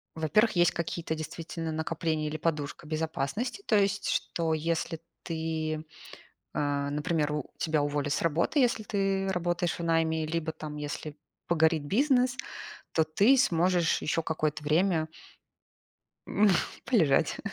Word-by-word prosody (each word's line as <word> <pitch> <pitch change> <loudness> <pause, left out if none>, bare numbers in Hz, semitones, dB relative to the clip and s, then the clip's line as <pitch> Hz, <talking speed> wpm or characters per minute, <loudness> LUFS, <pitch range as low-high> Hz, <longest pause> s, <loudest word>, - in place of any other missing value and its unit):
во-первых, 210 +8 +2
есть 175 -1 +5
какие-то 170 -1 -3
действительно 165 +1 -5
накопления 160 -1 -1
или 155 +1 -3
подушка 150 -2 -2
безопасности, 160 - -2
то 215 - +3
есть 200 -1 +1
что 165 -2 0
если 165 +1 -1 0.2
ты, 160 -1 -3 0.7
а, 145 -1 0
например, 150 +1 0
у 150 -2 -4
тебя 155 -2 +1
уволят 145 0 -1
с - - 0
работы, 170 - +2
если 245 -3 +2
ты 195 -2 0
работаешь 175 -1 -1
в - - -4
найме, 160 -1 +1
либо 160 0 -2
там, 150 -1 -7
если 150 0 -5 0.3
погорит 160 -2 +3
бизнес, 250 - +2 0.6
то 160 - +4
ты 205 +12 +4
сможешь 175 -5 +2
ещё 160 +2 0
какое-то 155 -1 -1
время 160 +1 +2 1.2
м, 210 0 +3 0.4
полежать. 160 - +3
160 Hz, 130 wpm, -29 LUFS, 155-175 Hz, 1.2 s, есть